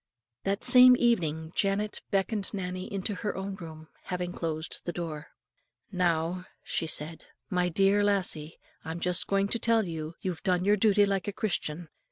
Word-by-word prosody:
That 195 +2 -1
same 250 0 +9
evening 160 -10 0
Janet 205 +1 0
beckoned 200 +1 +1
Nannie 185 -1 -5
into 200 +1 -2
her 205 +1 -4
own 195 +1 -4
room, 160 -3 -9
and 160 - -16 0.2
having 180 -1 -3
closed 160 -1 -4
the 175 - -3
door, 160 -4 -6 0.6
"Now," 180 -1 0 0.2
she 165 - -2
said, 160 +1 0 0.3
"my 180 -1 +1
dear 195 +4 +3
lassie, 180 -6 -1 0.3
I'm 165 +1 -5
just 180 0 0
going 195 0 +1
to 235 - 0
tell 225 -1 +2
you, 160 -1 -6
you've 180 -3 -4
done 180 -1 0
your 205 +1 +4
duty 205 0 +4
like 195 -1 -1
a 205 - -2
Christian. 175 -6 -2
185 Hz, 170 wpm, -28 LUFS, 165-200 Hz, 0.6 s, same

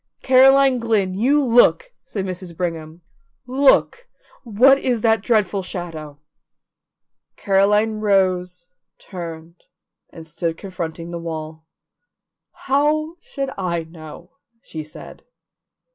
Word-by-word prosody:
"Caroline 265 0 +5
Glynn, 215 -5 0
you 270 +9 +2
look!" 255 - +3
said 195 -3 -5
Mrs. 185 -2 -7
Brigham. 165 -2 -5 0.4
"Look! 275 - +2 0.4
What 255 +4 +4
is 245 -5 -1
that 225 -2 +2
dreadful 210 -4 +1
shadow?" 165 -5 -7 1.2
Caroline 210 +2 +1
rose, 185 -3 0 0.3
turned, 170 -2 -9 0.5
and 165 -2 -12
stood 165 +1 -4
confronting 170 -3 -6
the 170 - -5
wall. 160 -1 -7 1.0
"How 310 +4 +1
should 275 -1 -5
I 170 -3 -2
know?" 160 -1 -13 0.3
she 160 -1 -7
said. 155 - -13
190 Hz, 100 wpm, -20 LUFS, 170-245 Hz, 1.2 s, Caroline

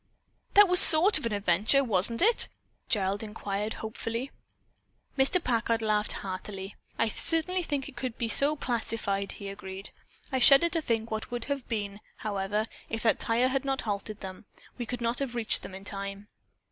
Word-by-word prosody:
"That 410 0 +8
was 360 0 +6
sort 325 +3 +9
of 270 - -3
an - - -5
adventure, 205 +7 +2
wasn't 230 - +1
it?" 460 +3 +3 0.4
Gerald 200 -1 0
inquired 210 -1 -4
hopefully. 230 +4 -5 0.8
Mr. 270 +6 +2
Packard 230 -2 0
laughed 210 -1 0
heartily. 190 +1 -6 0.2
"I 230 - +1
certainly 330 - +1
think 285 -5 -3
it - - -12
could 245 -1 -5
be 235 - -2
so 280 +6 +2
classified," 225 -6 -2
he 200 - -9
agreed. 195 0 -5 0.4
"I 260 - 0
shudder 275 +6 +6
to 330 -1 -1
think 230 -5 -2
what 220 0 -3
it - - -24
would 240 -1 -3
have 280 -3 -4
been, 205 -2 -4 0.2
however, 205 +1 -2 0.2
if 225 0 -4
that 225 - +2
tire 240 +3 +1
had 270 0 -1
not 270 -1 -2
halted 210 0 -5
them. 190 +1 -9 0.3
We 240 -2 -6
could 245 0 -5
not 235 +1 -1
have 265 -3 -4
reached 230 -2 0
them 190 - -9
in 195 - -10
time." 200 0 -7
225 Hz, 180 wpm, -28 LUFS, 200-265 Hz, 0.8 s, sort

